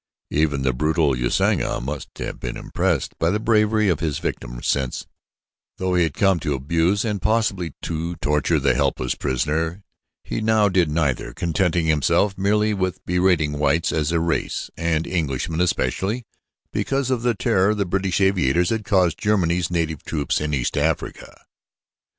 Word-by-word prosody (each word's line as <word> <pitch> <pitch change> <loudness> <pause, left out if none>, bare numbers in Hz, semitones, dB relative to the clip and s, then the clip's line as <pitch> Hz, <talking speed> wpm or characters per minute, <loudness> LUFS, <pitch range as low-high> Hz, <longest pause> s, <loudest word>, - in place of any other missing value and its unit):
Even 75 -2 +1
the 65 -1 +1
brutal 75 +1 +1
Usanga - - +1
must 70 +3 -5
have - - -5
been - - -5
impressed - - -1
by 85 - +2
the 105 +4 0
bravery 110 -1 +2
of 85 -6 +1
his 75 -4 -1
victim - - -4
since, 65 -3 -1 0.7
though 95 -1 -1
he 90 - +3
had 80 -4 0
come 95 -3 +3
to 75 -2 -1
abuse 85 - +1
and 105 -4 -2
possibly 105 -7 0
to 85 +1 -3
torture 75 +1 +1
the 70 -2 +2
helpless 65 0 0
prisoner, 80 +7 -2 0.4
he - - -4
now 110 -1 +3
did 90 -4 +2
neither, 75 -6 -1
contenting 85 +1 0
himself 80 +6 +2
merely 105 +2 +1
with 95 -2 -2
berating 90 -5 +1
whites 75 +3 +2
as 80 0 0
a 85 - +2
race 85 0 -2
and 85 -1 0
Englishmen 80 -1 -2
especially, 100 +6 0 0.5
because 135 -1 -1
of 125 -3 0
the 120 -1 +1
terror 100 +1 +2
the 100 -1 0
British 95 0 0
aviators 90 -4 +2
had 110 -1 -1
caused 95 -5 +2
Germany's 90 -5 +1
native 80 -4 -1
troops 75 -2 -1
in 75 0 -2
East 65 -5 -1
Africa. - - -3
85 Hz, 160 wpm, -22 LUFS, 75-100 Hz, 0.7 s, he